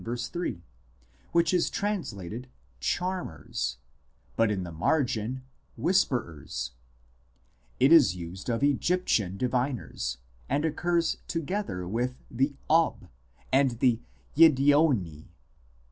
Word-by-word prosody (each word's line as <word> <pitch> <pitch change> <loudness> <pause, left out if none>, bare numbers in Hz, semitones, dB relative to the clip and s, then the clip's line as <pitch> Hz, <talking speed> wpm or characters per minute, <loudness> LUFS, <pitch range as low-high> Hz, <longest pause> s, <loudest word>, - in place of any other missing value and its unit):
3) 120 - -4 0.7
which 170 0 +3
is 175 -2 +2
translated 125 - -4 0.2
" 60 0 -35 0.2
charmers," 180 - -3 0.6
but 115 -1 +3
in 100 -3 -1
the 85 - -7
margin 120 - 0 0.2
" - - -40
whisperers 85 - 0 0.5
"; - - -37
it 135 +4 +5
is 140 - +6
used 90 +4 -7
of 115 +3 0
Egyptian 140 - +1
diviners, 125 - -2 0.3
and 145 +4 +1
occurs 170 +1 +1
together 165 - -3
with 120 +6 -1 0.2
the 135 +4 0
Ob 165 +1 +2 0.4
and 135 -3 +3
the 125 -4 +3 0.4
Yiddeoni. 140 - +4
125 Hz, 105 wpm, -28 LUFS, -, 0.7 s, is